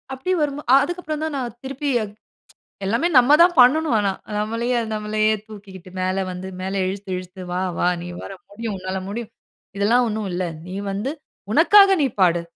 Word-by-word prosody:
அப்படி 265 +8 -3
வரும்போ, 295 0 -2
அ - - +9
அதற்கு 350 +1 -4
அப்புறம் 310 0 -3
தான் 315 -2 -3
நான் 240 -3 -4
திருப்பி, 275 +2 -3 1.0
எல்லாமே 230 - +1
நம்ம 255 +4 +7
தான் 350 0 +3
பண்ணணும். 295 +2 +4
ஆனா 200 -1 +1 0.3
நம்மளையே 230 +3 -1 0.2
நம்மளையே 215 0 +1
தூக்கிக்கிட்டு, 195 -4 -12
மேல 185 +1 0
வந்து 180 +1 -7
மேல 190 +1 -3
இழுத்து 195 0 -5
இழுத்து 185 +1 -9
"வா 180 +1 -1 0.2
வா 175 - +2 0.2
நீ - - -7 0.2
வர - - -8 0.2
முடியும். 215 +1 -5
உன்னால் 185 +1 -4
முடியும். 230 +2 -5 0.5
இதெல்லாம் 235 +5 +3
ஒண்ணும் 215 -2 -3
இல்ல. 180 +1 -1 0.2
நீ 185 - -6 0.2
வந்து 205 +8 -2 0.4
உனக்காக 390 - +7
நீ - - +3
பாடு. 175 -2 +4
215 Hz, 170 wpm, -22 LUFS, 190-270 Hz, 1.0 s, அ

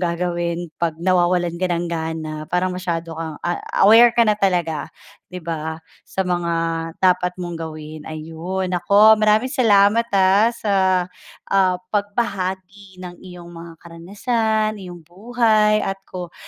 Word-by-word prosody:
gagawin 170 -1 -2
'pag 165 -2 -1
nawawalan 175 -1 +1
ka 185 - +1
ng 170 0 -2
gana, 160 -1 -4
parang 180 +1 0
masyado 170 -2 -4
kang 160 -2 -5
a 175 0 -2 0.2
aware 230 +3 +7
ka 235 - +5
na 215 - +3
talaga 175 -6 0 0.4
di 180 - -6
ba, 160 -2 -5 0.2
sa 190 -1 -4
mga 175 -1 -1 0.5
dapat 180 -1 +2
mong 175 -1 -5
gawin. 155 -1 -8
Ayun! 165 +5 -5
Naku, 200 +5 +5
maraming 215 +3 +2
salamat, 225 -5 +3
ah 195 +3 +4
sa, 220 -3 -3 0.7
ah 185 -2 +2 0.2
pagbahagi 195 -2 -3
ng 180 -1 -8
iyong 180 -2 -11
mga 170 -1 -11
karanasan, 215 +6 -2
iyong 175 -3 -11
buhay 215 +2 +2
at 195 0 -4
ko 180 -2 -9
180 Hz, 135 wpm, -20 LUFS, 170-205 Hz, 0.7 s, aware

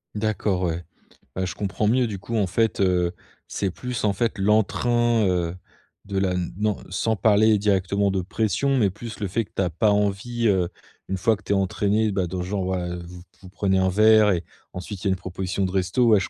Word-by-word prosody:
D'accord 105 -3 -1
ouais. 85 0 -2 0.5
Bah, 95 - -1
je 90 - -4
comprends 105 +1 -1
mieux 125 +2 +3
du 105 -3 -5
coup 110 +5 -5
en 105 -4 +2
fait, 110 +4 0
heu, 90 -2 +2 0.3
c'est 100 - -2
plus 125 +3 -5
en 105 - +2
fait 115 +2 -1
l'entrain, 115 +3 +2
heu, 90 -2 0 0.5
de 100 -1 -4
la 95 -1 +1 0.2
non, 105 -1 0
sans 110 +4 0
parler 110 +1 +4
directement 100 0 +1
de 95 -1 0
pression 110 +8 0
mais 105 -5 +3
plus 110 +4 -8
le 105 - -2
fait 110 +5 -1
que - - -32
tu - - 0
as 90 - +1
pas 95 +6 +2
envie, 105 +4 0
heu, 95 -4 +2 0.4
une 95 - -1
fois 110 +4 +2
que 105 - -21
tu - - -5
es - - +3
entraîné, 100 +3 +1
bah, 95 -2 0
dans 90 +1 -4
genre 95 +1 -2
ouais, 95 -1 -1
heu, 90 0 -6
vous 90 0 -11 0.2
vous 95 - -12
prenez 95 0 0
un 95 0 +2
verre 110 +1 +5
et 85 -2 0 0.3
ensuite 90 +1 -7
il - - 0
y - - +3
a - - +3
une - - +2
proposition 95 +1 -3
de 95 - -2
resto. 95 +6 +1
Ouais 110 -3 +6
je 95 - -4
100 Hz, 230 wpm, -24 LUFS, 95-110 Hz, 0.5 s, Ouais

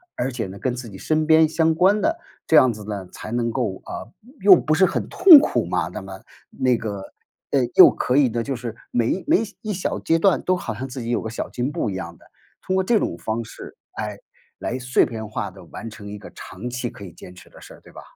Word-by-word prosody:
而 125 +2 -2
且 120 -3 -3
呢， 95 +1 -9
跟 130 -2 -2
自 125 -1 -7
己 95 - -10
身 155 0 0
边 160 0 +5
相 160 0 +2
关 190 +6 +3
的， 330 +8 0 0.3
这 160 - +2
样 130 -4 +7
子 105 -2 -9
呢， 100 -3 -5
才 110 - -9
能 120 0 0
够 115 -6 -3
呃， 115 - -7 0.3
又 195 -2 +9
不 155 -2 +1
是 190 +3 +5
很 - - -2
痛 345 -6 +9
苦 - - 0
嘛， - - -1
那 - - -7
么 - - -10 0.3
那 130 - +1
个， 105 -4 -5 0.5
诶， 125 -3 +1
又 - - +10
可 125 - -1
以 140 -1 +5
呢， 115 0 -2
就 135 +1 -3
是 115 -2 -6 0.2
每 120 +10 0
每 315 +3 +4 0.2
一 215 -1 -2
小 180 - -3
阶 165 0 +1
段 190 +1 +3
都 185 - +2
好 120 -11 -5
像 130 +5 -5
自 130 0 -7
己 115 - -5
有 120 - +1
个 110 - -5
小 115 - -5
进 125 +3 -3
步 130 - -2
一 95 - -4
样 85 -3 -6
的。 - - -22 0.4
通 185 - -2
过 190 - +2
这 220 +3 +2
种 - - -2
方 110 +6 -3
式， - - -11 0.2
哎， 105 -1 -5 0.4
来 130 - -4
碎 125 0 +2
片 110 -2 -6
化 110 - -4
地 95 0 -14
完 115 - -9
成 110 -2 -10
一 105 - -7
个 - - -12
长 95 +6 -9
期 125 0 -3
可 100 - -12
以 90 - -10
坚 90 +2 -13
持 - - -15
的 - - -17
事 - - -13
儿， - - -19
对 - - -18
吧？ - - -10
125 Hz, 275 characters per minute, -22 LUFS, 110-160 Hz, 0.5 s, 又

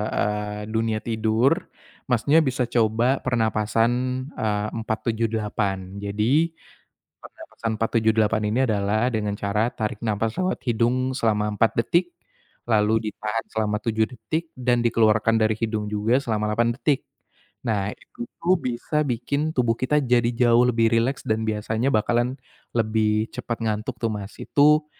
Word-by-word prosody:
eee, 105 0 -1
dunia 110 -1 0
tidur, 115 +6 +1 0.4
Masnya 135 +5 +3
bisa 130 -5 0
coba 120 +2 +1
pernapasan, 115 -1 +1 0.4
eee, 105 -4 -1
4-7-8. 110 -4 -2
Jadi 115 +12 +1 0.7
pernafasan 115 - -6
4-7-8 110 -1 +2
ini 120 - +1
adalah 105 +2 +1
dengan 110 -4 -1
cara 105 +4 0
tarik 105 0 -4
nafas 110 0 -1
lewat 185 0 -1
hidung 125 +3 +1
selama 105 -4 +1
4 115 +2 +2
detik, 175 +9 +1 0.6
lalu 110 0 +2
ditahan 105 +1 -3
selama 105 -1 0
7 110 0 0
detik 160 +6 -4
dan 125 -1 +1
dikeluarkan 115 -1 +3
dari 110 0 +2
hidung 110 -1 -2
juga 105 +4 +1
selama 105 -5 -1
8 115 +2 +1
detik. 135 +2 0 0.6
Nah 105 -2 0
itu - - -10 0.2
tuh 180 +2 +3
bisa 125 +5 -1
bikin 140 +5 -1
tubuh 120 -3 +2
kita 150 +4 +2
jadi 120 -2 +3
jauh 120 0 +4
lebih 115 -1 +3
rileks 120 +4 +1
dan 110 0 0
biasanya 110 +4 -1
bakalan 120 +4 +1 0.4
lebih 110 -1 +1
cepet 120 -2 -3
ngantuk 110 +3 -2
tuh, 115 -2 0
Mas. 100 0 -6
Itu 150 +1 +4
115 Hz, 135 wpm, -24 LUFS, 110-125 Hz, 0.7 s, jauh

